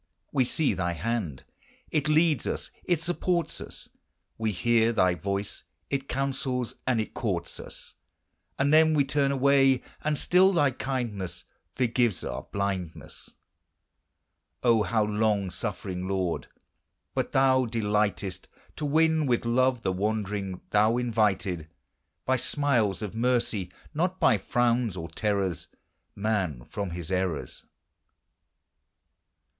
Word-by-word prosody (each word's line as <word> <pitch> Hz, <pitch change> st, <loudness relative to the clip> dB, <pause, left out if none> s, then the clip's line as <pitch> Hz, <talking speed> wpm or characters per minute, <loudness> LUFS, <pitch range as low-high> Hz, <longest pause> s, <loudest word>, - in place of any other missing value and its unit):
We 130 Hz, -2 st, +2 dB
see 140 Hz, 0 st, +1 dB
thy 90 Hz, -2 st, -1 dB
hand, 90 Hz, -, -3 dB, 0.5 s
it 150 Hz, -2 st, +1 dB
leads 155 Hz, -3 st, +3 dB
us, -, -, -3 dB
it 175 Hz, -3 st, +2 dB
supports 175 Hz, 0 st, -1 dB
us; -, -, -7 dB, 0.5 s
We 110 Hz, -1 st, -1 dB
hear 115 Hz, +3 st, +3 dB
thy 90 Hz, -6 st, +3 dB
voice, 100 Hz, +3 st, -3 dB, 0.3 s
it 135 Hz, -1 st, -1 dB
counsels 130 Hz, -2 st, -1 dB
and 125 Hz, -3 st, +2 dB
it 110 Hz, -, -3 dB
courts 90 Hz, -8 st, -2 dB
us; -, -, -8 dB, 0.6 s
And 140 Hz, +2 st, +2 dB
then 160 Hz, 0 st, +6 dB
we 140 Hz, -2 st, +3 dB
turn 140 Hz, 0 st, +1 dB
away; 135 Hz, -1 st, +4 dB, 0.2 s
and 155 Hz, -1 st, +1 dB
still 185 Hz, +5 st, +4 dB
thy 145 Hz, -6 st, +3 dB
kindness 120 Hz, -8 st, -4 dB, 0.3 s
Forgives 120 Hz, -5 st, +1 dB
our 60 Hz, +2 st, -5 dB
blindness. 95 Hz, -4 st, -4 dB, 1.3 s
O, 115 Hz, -3 st, +5 dB
how 110 Hz, 0 st, +2 dB
long 105 Hz, -2 st, +1 dB
suffering, 95 Hz, -1 st, -4 dB
Lord! 95 Hz, -3 st, -1 dB, 0.7 s
but -, -, -1 dB
thou 130 Hz, -1 st, +4 dB
delightest 105 Hz, -4 st, -1 dB, 0.3 s
To 150 Hz, -, -2 dB
win 160 Hz, 0 st, +3 dB
with 120 Hz, -2 st, +1 dB
love 125 Hz, 0 st, +2 dB
the 95 Hz, -, +1 dB
wandering: 100 Hz, -1 st, -2 dB
thou 110 Hz, +3 st, +4 dB
invited, 105 Hz, -8 st, 0 dB, 0.6 s
By 130 Hz, 0 st, +2 dB
smiles 120 Hz, -8 st, +1 dB
of 105 Hz, -, -4 dB
mercy, 115 Hz, -5 st, 0 dB, 0.2 s
not 180 Hz, +4 st, 0 dB
by 105 Hz, -, +4 dB
frowns 120 Hz, -1 st, +1 dB
or 80 Hz, -1 st, -5 dB
terrors, 95 Hz, -2 st, -1 dB, 0.5 s
Man 100 Hz, -, -1 dB
from 100 Hz, -2 st, -4 dB
his 85 Hz, 0 st, -6 dB
errors. 90 Hz, -9 st, -2 dB
110 Hz, 125 wpm, -27 LUFS, 95-135 Hz, 1.3 s, then